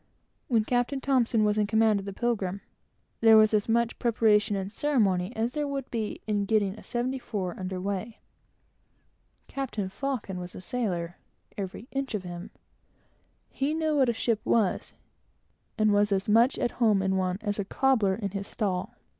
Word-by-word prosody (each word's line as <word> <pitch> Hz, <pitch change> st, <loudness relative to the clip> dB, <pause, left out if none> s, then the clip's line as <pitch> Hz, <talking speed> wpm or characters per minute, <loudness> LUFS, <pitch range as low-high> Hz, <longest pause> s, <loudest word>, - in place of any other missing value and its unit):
When 230 Hz, -5 st, +2 dB
Captain 245 Hz, +3 st, 0 dB
T 275 Hz, -, -4 dB, 0.3 s
was 210 Hz, 0 st, +2 dB
in 210 Hz, -, +2 dB
command 220 Hz, -1 st, +3 dB
of 195 Hz, -, -8 dB
the -, -, -3 dB
Pilgrim, 200 Hz, -3 st, -2 dB, 0.6 s
there 225 Hz, -1 st, +7 dB
was 215 Hz, 0 st, +5 dB
as 210 Hz, +1 st, +1 dB
much 235 Hz, 0 st, +1 dB
preparation 215 Hz, -2 st, +3 dB
and 195 Hz, 0 st, -3 dB
ceremony 205 Hz, -9 st, +1 dB
as 230 Hz, +2 st, -1 dB
there 295 Hz, -1 st, -1 dB
would 275 Hz, -2 st, -4 dB
be 220 Hz, -3 st, -3 dB
in 205 Hz, -2 st, 0 dB
getting 205 Hz, -2 st, +1 dB
a 215 Hz, -, -12 dB
seventy 255 Hz, +2 st, -2 dB
four 190 Hz, -7 st, -4 dB
under 185 Hz, 0 st, -4 dB
weigh. 200 Hz, +4 st, -4 dB, 1.3 s
Captain 230 Hz, -8 st, -3 dB
Faucon 225 Hz, -5 st, -4 dB
was 180 Hz, 0 st, -8 dB
a -, -, -7 dB
sailor, 180 Hz, -4 st, -3 dB, 0.4 s
every 200 Hz, +3 st, -6 dB
inch 270 Hz, -4 st, -2 dB
of 200 Hz, -, -3 dB
him; 175 Hz, 0 st, -7 dB, 1.0 s
he 285 Hz, +3 st, -1 dB
knew 315 Hz, -1 st, 0 dB
what 265 Hz, -4 st, +4 dB
a -, -, +2 dB
ship 225 Hz, -1 st, 0 dB
was, 215 Hz, -5 st, +1 dB, 0.8 s
and 215 Hz, -1 st, +3 dB
was 205 Hz, 0 st, +3 dB
as 195 Hz, 0 st, 0 dB
much 230 Hz, +5 st, +4 dB
at 240 Hz, -, 0 dB
home 210 Hz, -4 st, +4 dB
in 190 Hz, 0 st, +1 dB
one, 185 Hz, -1 st, 0 dB
as 205 Hz, -1 st, -2 dB
a -, -, +1 dB
cobbler 220 Hz, -3 st, +2 dB
in 200 Hz, -3 st, -4 dB
his 200 Hz, 0 st, -4 dB
stall. 190 Hz, -4 st, -2 dB
215 Hz, 175 wpm, -28 LUFS, 195-240 Hz, 1.3 s, there